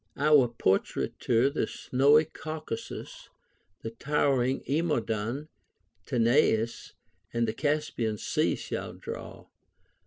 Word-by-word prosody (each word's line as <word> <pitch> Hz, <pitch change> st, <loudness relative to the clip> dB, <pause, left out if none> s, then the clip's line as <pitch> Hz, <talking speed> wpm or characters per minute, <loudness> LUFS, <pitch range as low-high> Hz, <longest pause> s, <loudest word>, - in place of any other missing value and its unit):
Our 145 Hz, -3 st, +5 dB
portraiture 115 Hz, +3 st, +1 dB
the 145 Hz, -, -1 dB
snowy 145 Hz, +4 st, +3 dB
Caucasus, 155 Hz, -6 st, -7 dB, 0.5 s
and 115 Hz, 0 st, -7 dB
towering 135 Hz, -3 st, +1 dB
Emodon, 135 Hz, -3 st, -1 dB, 0.6 s
Tanais, 115 Hz, -2 st, +2 dB, 0.4 s
and 115 Hz, 0 st, 0 dB
the 110 Hz, -, -1 dB
Caspian 145 Hz, -8 st, -1 dB
Sea -, -, 0 dB
shall -, -, -5 dB
draw. -, -, -8 dB
130 Hz, 90 wpm, -28 LUFS, 115-150 Hz, 0.6 s, Our